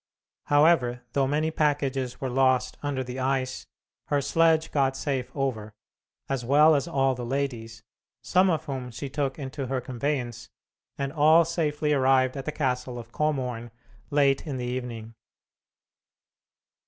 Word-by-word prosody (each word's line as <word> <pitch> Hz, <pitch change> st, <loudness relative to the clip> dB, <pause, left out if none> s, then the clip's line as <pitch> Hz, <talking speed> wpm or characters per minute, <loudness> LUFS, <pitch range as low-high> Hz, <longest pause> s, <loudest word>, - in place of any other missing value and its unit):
However, 145 Hz, -5 st, +3 dB
though 135 Hz, -1 st, +2 dB
many 155 Hz, +3 st, 0 dB
packages 140 Hz, -5 st, -1 dB
were 130 Hz, -2 st, -3 dB
lost 130 Hz, -1 st, +2 dB
under 140 Hz, -2 st, -2 dB
the 125 Hz, +1 st, -6 dB
ice, 130 Hz, 0 st, -1 dB, 0.4 s
her 145 Hz, -, +1 dB
sledge 160 Hz, +2 st, +2 dB
got 135 Hz, -2 st, +1 dB
safe 130 Hz, -4 st, -2 dB
over, 110 Hz, -7 st, -3 dB, 0.5 s
as 135 Hz, -3 st, -2 dB
well 150 Hz, +5 st, +5 dB
as 140 Hz, +3 st, 0 dB
all 135 Hz, -5 st, +1 dB
the 125 Hz, -1 st, -6 dB
ladies, 120 Hz, -3 st, -3 dB, 0.4 s
some 185 Hz, +1 st, +3 dB
of 160 Hz, -2 st, 0 dB
whom 130 Hz, -3 st, -5 dB
she 135 Hz, +4 st, -6 dB
took 140 Hz, -2 st, -2 dB
into 135 Hz, -1 st, -5 dB
her 130 Hz, 0 st, -1 dB
conveyance, 125 Hz, -2 st, -3 dB, 0.5 s
and 140 Hz, 0 st, -3 dB
all 160 Hz, +2 st, +5 dB
safely 150 Hz, -2 st, 0 dB
arrived 130 Hz, -1 st, +3 dB
at 135 Hz, -1 st, -5 dB
the -, -, -2 dB
castle 125 Hz, -4 st, -2 dB
of 115 Hz, -1 st, -9 dB
Komorn 125 Hz, -6 st, -2 dB, 0.4 s
late 140 Hz, 0 st, +2 dB
in 140 Hz, -3 st, -3 dB
the 125 Hz, -, -3 dB
evening. 120 Hz, -3 st, -5 dB
135 Hz, 145 wpm, -26 LUFS, 125-145 Hz, 0.5 s, well